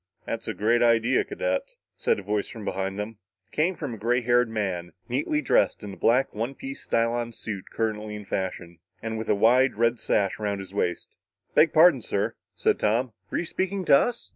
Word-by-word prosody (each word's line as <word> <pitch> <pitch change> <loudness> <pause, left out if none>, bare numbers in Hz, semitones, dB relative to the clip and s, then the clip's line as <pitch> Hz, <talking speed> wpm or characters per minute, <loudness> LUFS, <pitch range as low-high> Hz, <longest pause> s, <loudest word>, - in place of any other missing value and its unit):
"That's - - -4
a - - -3
great 115 +3 +2
idea, 115 +1 +4
cadet," - - -2 0.2
said - - +1
a 100 - -7
voice 105 +1 -1
from 110 -3 -9
behind 95 0 -2
them. 105 +1 -5 0.3
It - - -44
came 170 +5 +2
from 145 -8 -5
a 110 - -8
gray 120 +3 +1
haired 120 0 +3
man, 95 -6 -3
neatly 150 +4 0
dressed 125 - +2
in 100 - -6
the - - -8
black 125 +4 +2
one 115 +6 -3
piece 270 0 -7
stylon 115 0 0
suit 100 -4 -6
currently 105 -1 -2
in 105 -1 -8
fashion, 90 -3 -4 0.2
and 110 0 -3
with 110 - -5
a - - +4
wide 125 +6 +4
red 115 +1 +2
sash 100 0 0
around 105 -1 -1
his 95 -1 -9
waist. 90 -3 -2 0.4
"Beg 160 -1 +5
pardon, 160 -5 +6
sir," 100 -2 -1 0.2
said - - +1
Tom, 115 +3 +1 0.2
"were - - -2
you - - -1
speaking 190 +2 -2
to - - +7
us?" 235 +11 0
115 Hz, 205 wpm, -26 LUFS, 105-130 Hz, 0.4 s, to